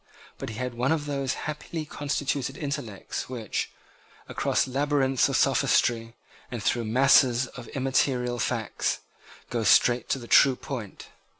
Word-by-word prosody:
But - - -5
he 110 - -7
had 125 +1 -3
one 125 +4 0
of 155 -2 0
those 140 -2 -2
happily 155 +1 -5
constituted 140 -2 -2
intellects 125 -11 -5
which, 115 -5 -3 0.6
across - - 0
labyrinths 135 -1 +1
of - - +1
sophistry, 115 0 +2 0.3
and 120 -3 -5
through 120 -1 +1
masses 130 +1 +4
of - - -11
immaterial 130 -2 0
facts, 115 -2 -1 0.5
go 120 -2 -1
straight 120 +4 +4
to - - +1
the 120 - -9
true 135 +2 +6
point. 120 -7 -7
130 Hz, 135 wpm, -26 LUFS, 120-140 Hz, 0.6 s, true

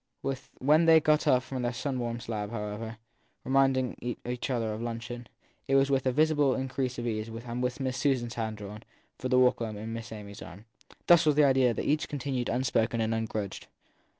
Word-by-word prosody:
When 150 +5 +4
they 165 -1 +8
got 155 0 +2
up 125 0 +4
from 130 +1 -4
their 120 0 -1
sun 130 +1 -3
warmed 120 -1 -3
slab, 105 -3 -3
however, 110 0 -5 0.5
reminding 130 -2 +1
each 125 +2 -3
other 115 -4 -1
of 110 - -5
luncheon, 120 +1 -5 0.4
it 135 - +2
was 135 0 +4
with 135 -1 +2
a - - +3
visible 145 -1 +3
increase 130 -1 -2
of 120 - -4
ease 110 -1 -2
and 115 +2 -6
with 125 +1 -1
Miss 130 -1 -2
Susan 135 -4 +1
s - - -7
hand 110 -2 -3
drawn, 105 +1 -8 0.4
for 130 - -3
the 125 - +4
walk 125 -1 +4
home, 110 -3 -4
into 105 - -7
Miss 115 0 -6
Amy 105 -2 -8
s 100 - -11
arm. 95 +4 -11 0.4
Thus 170 -1 +6
the; 150 -1 +4
idea 135 -2 +4
of 115 - -2
each 150 +1 +1
had - - -18
continued 135 -3 -2
unspoken 120 -2 +1
and 110 0 +1
ungrudged. 110 -3 -3
120 Hz, 205 wpm, -29 LUFS, 115-135 Hz, 0.5 s, they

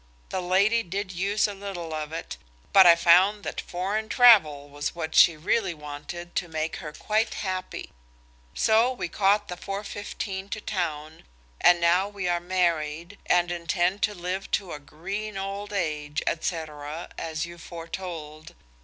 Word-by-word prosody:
The 185 - -2
lady 200 +6 +3
did 195 0 -4
use 200 +4 +1
a 205 - -5
little 195 -5 -6
of 155 -1 -4
it, 165 +1 -5 0.4
but 190 -2 +9
I 170 - +9
found 185 +5 +5
that - - -4
foreign 200 +5 -3
travel 190 - +6
was 145 +2 -4
what 160 -2 -4
she 165 -2 +6
really 180 +3 0
wanted 150 +4 -8
to 175 - -1
make 160 0 -3
her 155 -4 -7
quite 215 +8 -1
happy. 185 -2 -4 0.6
So 225 +3 +4
we 250 - -4
caught 205 +4 +2
the 180 - -5
4.15 195 0 -5
to 215 - -4
town, 160 -6 -4 0.4
and 175 -1 +6
now 175 +4 +3
we 200 -3 -4
are 175 0 +1
married, 170 0 -1
and 175 0 +3
intend 175 +3 0
to 210 - +1
live 180 +2 -4
to 190 -3 -10
a 150 - -6
green 195 +8 -6
old 195 +1 -5
age, 150 -6 -2
&c., 170 +2 0 0.6
as 160 0 -3
you 170 0 -11
foretold. 165 -2 -8
180 Hz, 155 wpm, -26 LUFS, 165-200 Hz, 0.6 s, but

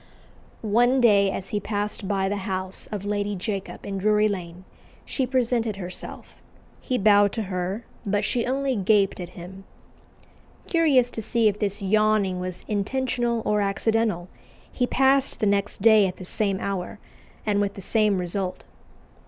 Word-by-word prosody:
One 240 +5 +3
day, 205 -5 +5
as 190 0 -4
he 210 - -1
passed 205 0 -3
by 195 -1 0
the 205 +1 -1
house 185 0 -3
of 205 -2 -4
Lady 205 0 -1
Jacob 195 0 -5
in 195 -1 -4
Drury 210 +1 +3
Lane, 180 -2 -5 0.4
she 260 -3 -1
presented 240 -4 0
herself: 185 -2 -8 0.4
he 255 - -2
bowed 205 -2 +5
to 225 - -2
her, 190 +3 -3 0.2
but 205 -1 0
she 240 -1 0
only 270 0 0
gaped 200 -1 +2
at 175 -1 -6
him. 185 +2 -10 1.0
Curious 280 -8 +3
to 225 - -4
see 225 +1 +2
if 210 0 0
this 205 0 -2
yawning 210 -2 +2
was 180 -1 -5
intentional 235 +2 -1
or 210 0 +2
accidental, 205 -2 0 0.4
he 250 - 0
passed 270 +1 +2
the - - +1
next 200 -1 0
day 220 -3 +6
at 180 - -6
the 185 - -8
same 195 0 0
hour, 195 0 -4 0.5
and 205 -1 +1
with 200 -1 -1
the - - -8
same 210 0 +2
result. 180 +1 -3
205 Hz, 160 wpm, -24 LUFS, 195-225 Hz, 1.0 s, day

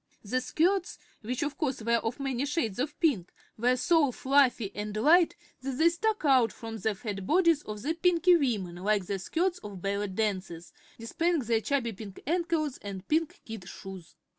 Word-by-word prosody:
The 255 +5 0
skirts 360 +7 +1 0.2
which 245 +4 -2
of 295 0 -4
course 275 -5 -1
were 235 +1 +3
of 230 +3 -3
many 270 0 -1
shades 260 - -1
of 295 +3 -3
pink 250 - +1 0.2
were 245 +3 +2
so 300 0 +3
fluffy 260 -5 +2
and 210 0 -4
light 325 +9 +5 0.3
that 270 +1 -3
they 325 +3 +5
stuck 425 +2 -1
out 255 -6 +5
from 225 -1 -7
the 220 -1 0
fat 195 -3 -5
bodies 335 -2 +4
of 210 -4 -7
the 310 +4 0
Pinkie 350 +1 +4
women 210 - -1
like 200 +1 +1
the 195 +1 -3
skirts 350 - -1
of 205 -3 -8
ballet 200 +1 -1
dancers, 190 -4 -3 0.2
displaying 330 +8 0
their 230 -2 +1
chubby 240 -3 -1
pink 200 -1 -9
ankles 325 -3 0
and 195 -2 -7
pink 315 0 0
kid 215 -5 -8
shoes. 190 -3 -10
250 Hz, 180 wpm, -29 LUFS, 205-315 Hz, 0.3 s, light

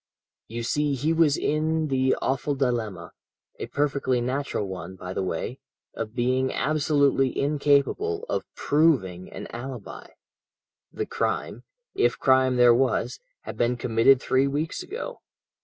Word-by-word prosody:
"You 115 +1 -5
see 145 +4 0
he 150 +5 0
was 160 -3 +3
in 155 +1 0
the 130 -1 +2
awful 135 +2 0
dilemma 115 -10 -2 0.5
a - - -4
perfectly 140 -3 0
natural 125 -3 -2
one, 95 -1 -7
by 90 0 -7
the - - -2
way 95 +8 -3 0.3
of 115 0 -5
being 130 +2 +1
absolutely 140 -3 +1
incapable 150 - +1
of - - -1
proving 130 - +1
an - - -7
alibi. 120 -2 -7 0.8
The - - -3
crime - - -3 0.3
if 395 +1 +1
crime 130 -1 +3
there 125 -1 +6
was 130 - 0 0.2
had - - -8
been 120 +1 +1
committed 120 +3 +4
three 130 +1 +2
weeks 150 +4 -2
ago. - - -7
130 Hz, 135 wpm, -25 LUFS, 120-145 Hz, 0.8 s, there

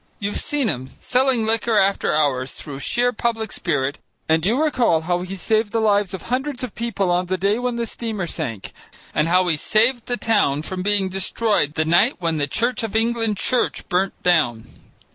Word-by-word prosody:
You've 205 0 -2
seen 290 -4 0
him 130 - -3
selling 255 -3 +1
liquor 225 0 +1
after 195 0 +2
hours 135 -4 +1
through 140 -2 -7
sheer 245 +10 +1
public 225 -1 -2
spirit, 145 -4 -1 0.3
and 160 0 +2
you 225 +8 +2
recall 250 - +2
how 175 +2 -1
he 185 +2 -5
saved 215 +3 0
the 230 - 0
lives 205 -3 +2
of 190 - -9
hundreds 260 +1 -2
of 250 - -5
people 220 -6 -1
on 180 +1 +1
the 185 +1 -1
day 200 +5 +1
when 245 -1 -2
the 235 0 -1
steamer 220 -4 -4
sank, 115 - -5 0.4
and 150 - +1
how 180 +1 +3
he 165 - +2
saved 230 - +2
the 245 - -1
town 200 -12 +1
from 185 +2 -4
being 200 0 +1
destroyed 190 -4 0
the 155 - +1
night 175 - +4
when 165 -2 -1
the 145 - 0
Church 235 - 0
of 225 -2 -4
England 225 -2 +1
Church 250 +5 0
burnt 190 +2 0
down. 120 -11 +2
200 Hz, 195 wpm, -21 LUFS, 165-230 Hz, 0.4 s, night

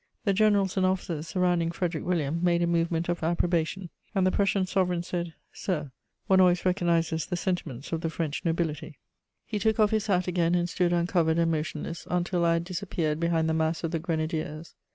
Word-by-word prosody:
The 200 - +3
generals 200 -2 +3
and 190 - +3
officers 175 -4 -2
surrounding 175 -1 +1
Frederic 170 -2 -2
William 165 -2 -1
made 175 -1 +3
a - - +3
movement 170 0 0
of 175 0 -1
approbation, 170 +1 0 0.2
and 190 -1 +3
the 185 - +3
Prussian 195 -1 +2
sovereign 180 -2 0
said: 175 -2 -4 0.2
"Sir, 150 -7 -3 0.3
one 190 -1 +5
always 180 0 +3
recognises 170 -3 +1
the 180 - -2
sentiments 160 -8 -3
of 165 -1 -1
the 165 - -1
French 160 -2 -3
nobility." 165 -2 -2 0.5
He 210 - -3
took 220 +2 +1
off 210 -1 +4
his 220 -1 0
hat 185 -3 +1
again 175 -1 +2
and 175 0 +1
stood 175 0 0
uncovered 170 -2 +2
and 165 0 +2
motionless, 155 +1 -4
until 175 0 0
I 165 - +4
had 165 0 0
disappeared 170 -4 -2
behind 165 -1 +1
the 160 - +1
mass 160 +1 0
of 165 - -1
the 165 - -1
grenadiers. 155 -1 -3
170 Hz, 195 wpm, -27 LUFS, 165-180 Hz, 0.5 s, one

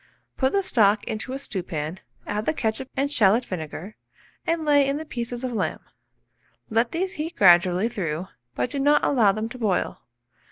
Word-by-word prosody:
Put 265 0 +1
the 395 - +2
stock 210 - +3
into 220 +4 -4
a - - -2
stewpan, 175 - -4 0.3
add 210 +1 -3
the 315 - +1
ketchup 230 +2 -2
and 280 +1 0
shalot 230 -2 +4
vinegar, 180 +3 -6 0.5
and 330 -1 0
lay 290 -1 +5
in 275 +1 0
the 315 - -6
pieces 240 -2 -5
of 255 -1 -2
lamb. 225 - -2 0.9
Let 230 +2 +2
these 365 +3 -2
heat 325 +3 -5
gradually 180 +2 +5
through, 180 -7 -3 0.3
but - - -1
do 285 - -3
not 290 +2 +4
allow 230 -8 +4
them 215 +3 -3
to 255 - -9
boil. 205 -6 0
230 Hz, 175 wpm, -24 LUFS, 195-280 Hz, 0.9 s, lay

